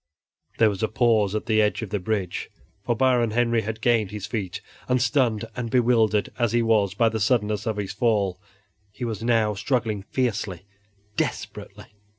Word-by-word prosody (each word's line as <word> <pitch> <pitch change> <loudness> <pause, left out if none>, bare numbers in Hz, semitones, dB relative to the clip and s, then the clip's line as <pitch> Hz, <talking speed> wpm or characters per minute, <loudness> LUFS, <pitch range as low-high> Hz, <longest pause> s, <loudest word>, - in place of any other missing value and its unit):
There 110 -2 +5
was 95 - -6
a 110 - +2
pause 110 -3 +2
at 110 - -2
the 110 -1 +3
edge 105 +2 0
of 105 - -7
the 105 - 0
bridge, 95 -2 -2 0.3
for 120 - 0
Baron 125 -1 +3
Henry 115 0 +2
had 110 +1 -5
gained 115 -3 +2
his 105 -1 -6
feet 100 -6 -4 0.3
and, 125 0 +3
stunned 120 -3 +1
and 120 -2 -3
bewildered 115 -4 +2
as 120 -2 +1
he 120 0 +3
was 105 -4 +2
by 115 +2 +3
the 110 0 -1
suddenness 105 -1 +1
of 110 -2 -1
his 100 -2 -3
fall, 100 -6 0 0.5
he 105 +4 -5
was 110 -2 -4
now 115 -2 +2
struggling 110 0 -1
fiercely, 105 -5 -2 0.5
desperately. - - -4
110 Hz, 175 wpm, -24 LUFS, 105-120 Hz, 0.5 s, There